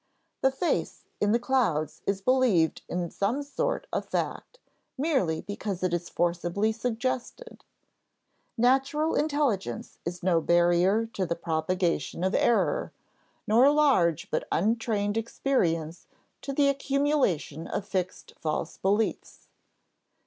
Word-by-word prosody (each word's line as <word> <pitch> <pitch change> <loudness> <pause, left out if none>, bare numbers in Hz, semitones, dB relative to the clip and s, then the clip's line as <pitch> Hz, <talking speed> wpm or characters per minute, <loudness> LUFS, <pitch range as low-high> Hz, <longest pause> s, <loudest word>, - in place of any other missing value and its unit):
The 265 - +4
face 270 +6 -2 0.2
in 205 - +2
the 230 - +4
clouds 235 - 0
is 195 -1 -1
believed 245 -11 +3
in 175 0 -1
as 170 - -7
some 235 +9 0
sort 290 +12 -2
of - - 0
fact, - - -3 0.4
merely 260 - 0
because 205 -2 -5
it 180 -1 +1
is 175 0 -2
forcibly 175 +5 0
suggested. 245 - -4 0.9
Natural 270 +6 +2
intelligence 285 - -1
is 175 +1 -5
no 175 -3 +3
barrier 175 +6 +3
to 190 -2 -1
the 170 - -1
propagation 170 +1 -1
of 190 +2 +1
error, - - +2 0.5
nor 235 +5 +5
large 220 - +2
but - - -1
untrained 215 +1 0
experience 175 - -1 0.3
to 275 - -4
the 280 +1 +3
accumulation 275 - 0
of 200 - -4
fixed 185 -2 -3
false 160 +1 -3
beliefs. 205 +3 -1
205 Hz, 120 wpm, -27 LUFS, 175-265 Hz, 0.9 s, nor